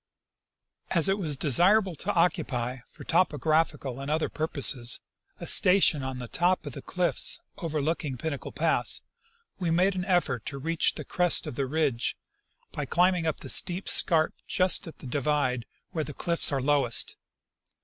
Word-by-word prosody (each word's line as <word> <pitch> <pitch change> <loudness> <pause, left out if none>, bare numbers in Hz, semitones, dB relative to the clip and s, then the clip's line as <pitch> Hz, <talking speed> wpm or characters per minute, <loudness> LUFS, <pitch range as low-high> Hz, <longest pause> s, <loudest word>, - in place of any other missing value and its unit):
As 170 -1 +4
it 195 +1 +1
was 155 -7 -2
desirable 180 - +4
to 205 +7 -2
occupy, 140 -8 0
for - - -14
topographic 160 -3 +1
and 135 +2 -5
other 155 +1 0
purposes, 135 -6 +1 0.4
a - - -7
station 180 -5 +4
on 130 -1 -5
the 125 -1 -7
top 175 +6 0
of 145 - -7
the - - -8
cliffs 180 -1 -1 0.2
overlooking 155 -3 -2
Pinnacle 145 +1 -5
pass, - - +1 0.6
we 175 -3 -1
made 180 +4 +2
an 185 -1 -4
effort 170 - 0
to 140 -1 -5
reach 165 +4 -1
the - - -7
crest 180 -1 +2
of - - -6
the 135 +2 -2
ridge 140 -5 -1 0.5
by 145 -2 -5
climbing 180 +2 +2
up 155 - -2
the - - -8
steep 185 +1 +2
scarp 160 -3 +3
just 185 -1 +2
at 165 - -10
the - - -13
divide, 130 -3 -1 0.2
where 160 -4 -2
the 150 - -8
cliffs 170 -2 +2
are 135 -2 -1
lowest. 140 -4 +1
155 Hz, 160 wpm, -27 LUFS, 135-175 Hz, 0.6 s, As